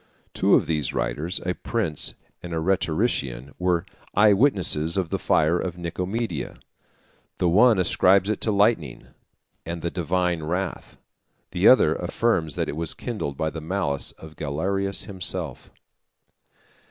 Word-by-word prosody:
Two - - +4
of - - +3
these 75 -5 -1
writers, 85 +5 -2
a 90 - 0
prince 95 -7 -3 0.3
and 85 -1 -5
a - - 0
rhetorician, 80 - -1
were 90 -1 +1 0.3
eye 105 0 +6
witnesses 95 - +2
of 90 -4 0
the - - -2
fire 80 +3 +2
of 90 -2 -4
Nicomedia. 90 +2 -3 0.8
The 90 - +1
one 110 +6 +5
ascribes 95 +2 +4
it 110 -1 -1
to 110 - +1
lightning, 100 - +1 0.5
and 85 0 -6
the 85 - -1
divine 90 0 0
wrath; 90 +4 -4 0.5
the - - +3
other - - +6
affirms, 85 -10 0
that - - -1
it - - -4
was 80 0 -1
kindled 100 - -4
by 80 0 -1
the 80 - -6
malice 80 -4 -2
of 80 -1 -13
Galerius 95 +7 -1
himself. 95 -4 -4
90 Hz, 140 wpm, -24 LUFS, 80-100 Hz, 0.8 s, eye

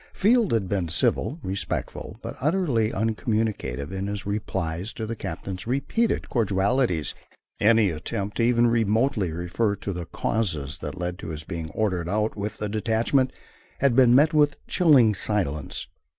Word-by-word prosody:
Field 225 +2 +3
had 110 -5 +1
been 95 -3 -1
civil, 85 - +1
respectful, 95 +1 -4
but - - -5
utterly 140 - +1
uncommunicative 110 - -1
in 95 +1 -3
his 100 0 -4
replies 95 -2 -3
to 110 - -4
the 115 +1 -4
captain's 95 -2 -6
repeated 140 - 0
cordialities. 100 - +1 0.5
Any 110 -3 +4
attempt 100 +6 -4
to 115 - +2
even 120 0 +4
remotely 115 -3 +2
refer 90 +6 -1
to 100 0 -5
the 85 -2 -5
causes 80 -11 -2
that - - -6
led 90 +1 -3
to - - -7
his 80 -1 -5
being 80 0 -5
ordered 90 -6 0
out 105 +2 0
with 105 +1 -4
the 105 - -3
detachment 115 +5 +1 0.5
had 135 -3 +2
been 125 -2 +6
met 150 +4 +5
with 145 -1 +3
chilling 135 -11 +5
silence. 90 -8 -2
105 Hz, 150 wpm, -25 LUFS, 90-120 Hz, 0.5 s, been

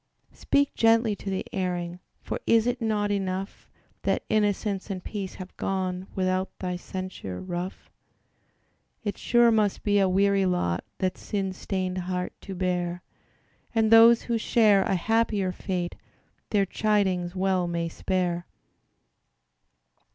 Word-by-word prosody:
Speak 285 0 +1
gently 225 -1 +3
to 200 - -6
the 190 -1 -2
erring: 180 -2 -2 0.2
For - - -3
is 230 -1 +5
it 245 0 -1
not 210 -2 0
enough 195 -1 -3 0.3
That - - 0
innocence 205 -2 0
and 185 -2 -4
peace 200 -3 -5
have 185 -1 -9
gone, 185 -1 -2
Without 185 0 -1
thy 180 -1 -3
censure 185 - -6
rough? 180 +1 -5 1.1
It 205 -2 -2
sure 240 -1 +4
must 215 -3 +1
be 205 -1 +3
a 190 -1 +3
weary 195 0 +3
lot, 90 - 0
That 185 -1 -1
sin 195 -2 -2
stained 185 -1 -3
heart 180 0 -3
to 195 - -7
bear, 180 -1 -1 0.7
And 220 -1 +3
those 230 +1 +8
who 235 -1 -1
share 215 -3 +4
a 190 - +1
happier 210 0 +1
fate 180 -2 -3 0.6
Their 200 -2 +2
chidings 190 -3 0
well 185 -1 +1
may 170 -1 -1
spare. 175 0 -1
190 Hz, 135 wpm, -26 LUFS, 180-210 Hz, 1.1 s, those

